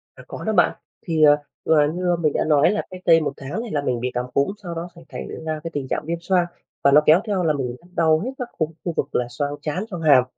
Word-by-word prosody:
À, - - -13
có - - -7
đó 220 - 0
bạn. 180 -5 +3 0.3
Thì, 160 -2 +1
ờ, 145 -1 +8 0.3
vừa 150 -2 +4
như 175 -1 +1
mình 155 -3 +2
đã - - 0
nói 150 +1 +4
là 210 - 0
cách 185 0 -9
đây 165 -1 +7
1 155 - -1
tháng 140 +10 -5
thì 235 - -7
là 145 -5 -1
mình 125 -4 -1
bị 125 +1 -1
cảm 125 0 -1
cúm, 140 - +2
sau 170 -2 -5
đó 170 +2 -5
sẽ 170 - -13
thành - - -7 0.2
ra 155 -1 -2
cái 165 - -3
tình 135 -2 -3
trạng - - -2
viêm 170 0 -2
xoang 180 0 +2 0.4
và 140 - +7
nó 150 - +8
kéo 160 +4 +7
theo 200 -4 0
là 160 - +3
mình 125 -4 -3 0.2
đau 160 -2 +3
nhức 260 - -4
các 250 -2 -4
cục 155 -1 0
khu 175 - -1
vực - - -2
là 125 - +1
xoang 145 +4 -3
trán, 170 +6 -2
xoang 175 -4 -5
hàm 140 -5 +6
155 Hz, 285 wpm, -22 LUFS, 145-175 Hz, 0.4 s, ờ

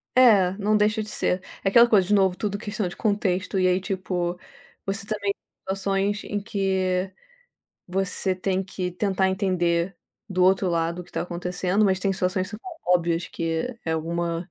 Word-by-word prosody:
É, 215 -8 +6
não 215 +1 +2
deixa 210 +1 +2
de 215 - -6
ser. 180 -2 0 0.2
É 195 - +3
aquela 235 +4 +7
coisa 195 -5 +5
de 205 - +2
novo 190 -3 +4
tudo 205 +1 -2
questão 210 -1 -3
de 175 - -8
contexto 200 -3 0
e 185 - +3
aí 180 0 +3
tipo, 180 -2 -2 0.5
você 200 +1 -3
também 205 -2 -1 0.3
situações 195 +2 -1
em 205 0 -3
que 190 -3 0 0.8
você 190 0 -1
tem 190 +1 -1
que 185 -1 -4
tentar 190 +1 +1
entender 180 -2 0 0.3
do 185 -2 0
outro 190 0 +4
lado 170 +1 -1
o - - -16
que - - -21
tá - - -1
acontecendo, 180 +3 0
mas 190 -2 +2
tem 195 0 +1
situações 185 0 0
são 210 +1 -7
tão 365 +10 -9 0.2
óbvias 170 -1 0
que 165 +9 -3
é 160 - -1
alguma, 170 +1 -2
190 Hz, 180 wpm, -25 LUFS, 180-205 Hz, 0.8 s, aquela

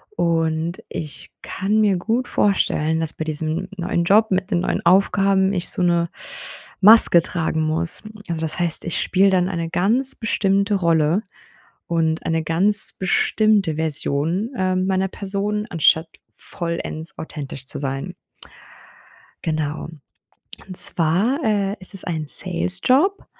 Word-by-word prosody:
und 165 0 -1
ich 150 -2 -2
kann 205 +3 -1
mir 200 -3 +2
gut 230 +7 -2
vorstellen, 160 -5 0
dass 160 -1 -3
bei 160 - -5
diesem 160 +3 -3
neuen 175 -1 -1
Job 215 +5 +3
mit 190 +1 -1
den 175 -3 +1
neuen - - -2
Aufgaben 195 +1 +3
ich 180 -2 0
so - - +1
'ne 170 -1 +1 0.7
Maske 205 -4 +8
tragen 160 -2 -2
muss. 160 +2 -1 0.3
Also, 165 -2 -3
das 160 +2 -4
heißt, 170 -1 -1
ich 170 - -3
spiele 195 +1 +2
dann 185 -2 +1
eine 170 -3 -4
ganz 235 +10 +1
bestimmte 200 -2 0
Rolle 165 0 +1 0.7
und 165 -1 -1
eine 165 -1 0
ganz 195 +6 +3
bestimmte 195 -2 +1
Version, 160 - -2
ähm, 185 0 0
meiner 190 0 0
Person, 205 +2 -3
anstatt 160 0 +2 0.3
vollends 170 -2 -6
authentisch 140 -4 -7
zu - - -3
sein. 135 +6 -4 1.3
Genau. 155 -2 -3 0.8
Und 185 - -8
zwar, 185 - +3
äh, 205 -2 0
ist 185 +2 0
es 195 - +1
ein 160 -3 -4
Sales-Job 195 - +2
175 Hz, 135 wpm, -20 LUFS, 160-195 Hz, 1.3 s, Maske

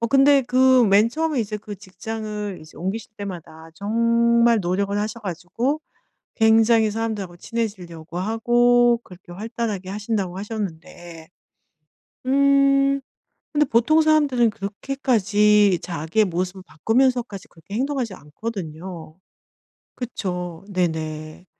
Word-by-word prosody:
어 230 - +1
근데 275 +2 +5
그 255 0 +4
맨 205 +2 +5
처음에 310 0 -1
이제 210 -1 -3
그 210 -1 -9
직장을 210 0 -6
이제 155 - -16
옮기실 200 +5 -4
때마다 165 -5 -8
정말 235 +3 +3
노력을 195 +3 -1
하셔 215 +2 -3
가지고 215 - -2 0.6
굉장히 225 0 +4
사람들하고 210 -5 -4
친해지려고 180 -7 -5
하고 240 +3 +3
그렇게 180 -1 -15
활달하게 215 -1 -4
하신다고 200 -3 -3
하셨는데 175 -5 -7 1.0
음 275 0 +3 0.5
근데 300 -1 +3
보통 260 +7 +3
사람들은 290 -7 +3
그렇게까지 210 -3 +2
자기의 170 +5 0
모습을 185 +2 -3
바꾸면서까지 230 +3 0
그렇게 170 +4 -12
행동하지 255 -3 -2
않거든요. 165 -1 -7 0.8
그쵸. 180 -7 -5
네네. 160 -2 -3
210 Hz, 285 characters per minute, -22 LUFS, 180-235 Hz, 1.0 s, 근데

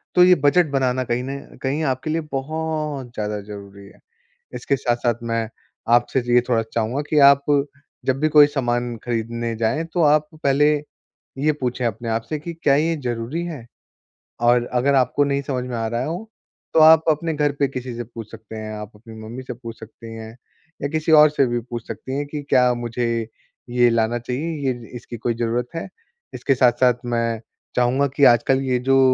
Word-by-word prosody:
तो 180 - +7
ये 180 0 +7
बजट 175 +5 +5
बनाना, 130 -2 +1
कहीं 120 0 -2
न 135 +1 -8
कहीं, 140 +4 -1
आपके 130 +1 -1
लिए 165 +1 0
बहुत 150 -1 -3
ज़्यादा 105 -1 -3
ज़रूरी 100 -1 -10
है। - - -18 0.6
इसके 140 - -1
साथ-साथ 120 -1 0 0.2
मैं 115 -1 -1 0.5
आपसे 120 +2 +2
ज 120 - -12
ये 125 - +6
थोड़ा 115 -2 +2
चाहूँगा 115 +4 0
कि 150 - +3
आप 140 0 +4 0.6
जब 130 0 +1
भी 155 - +3
कोई 150 -1 +7
सामान 120 -4 -1
खरीदने 115 0 -2
जाएँ, 115 +8 0
तो 165 +1 -1
आप 150 0 +4 0.2
पहले 140 +1 +4 0.7
ये 150 +3 +2
पूछें 125 0 -1
अपने 115 +1 -3
आप 115 0 0
से 155 - -2
कि, 170 +3 -6
"क्या 155 -4 +2
ये 160 +3 +1
ज़रूरी 120 +7 -3
है?" 150 -9 -7 0.8
और 120 0 +4
अगर 135 +3 +2
आपको 130 +2 +2
नहीं 140 0 0
समझ 130 -2 -3
में 125 - -3
आ 115 - -2
रहा 120 +3 -2
हो, 175 +8 -5 0.4
तो - - +5
आप 160 0 +8
अपने 160 +1 0
घर 145 -1 +1
पे 140 - +3
किसी 130 -2 -6
से 120 - -4
पूछ 115 -2 -10
सकते 110 0 -11
हैं। 110 0 -6
आप 105 0 -8
अपनी 110 +1 -13
मम्मी 120 +4 -7
से 125 - -6
पूछ 115 -1 -10
सकती 115 +1 -11
हैं, 110 0 -8 0.5
या 140 - 0
किसी 160 +1 -1
और 150 0 +8
से 145 -2 +2
भी 120 0 -1
पूछ 120 -1 -7
सकती 130 +1 -5
हैं 145 - -2
कि, 145 0 -5
"क्या 125 -1 +4
मुझे 115 -1 -2 0.4
ये 120 0 +4
लाना 115 +1 +1
चाहिए? 140 +5 -3
ये 120 -2 -12
इसकी 120 0 -8
कोई 120 +1 -1
ज़रूरत 120 +1 -1
है?" 165 - -4 0.5
इसके 135 - 0
साथ-साथ 125 0 +4
मैं 115 -2 -1 0.3
चाहूँगा 125 +3 +2
कि 145 - +1
आजकल 130 +3 +1
ये 125 - +2
जो 135 0 +5
125 Hz, 195 wpm, -22 LUFS, 115-145 Hz, 0.8 s, आप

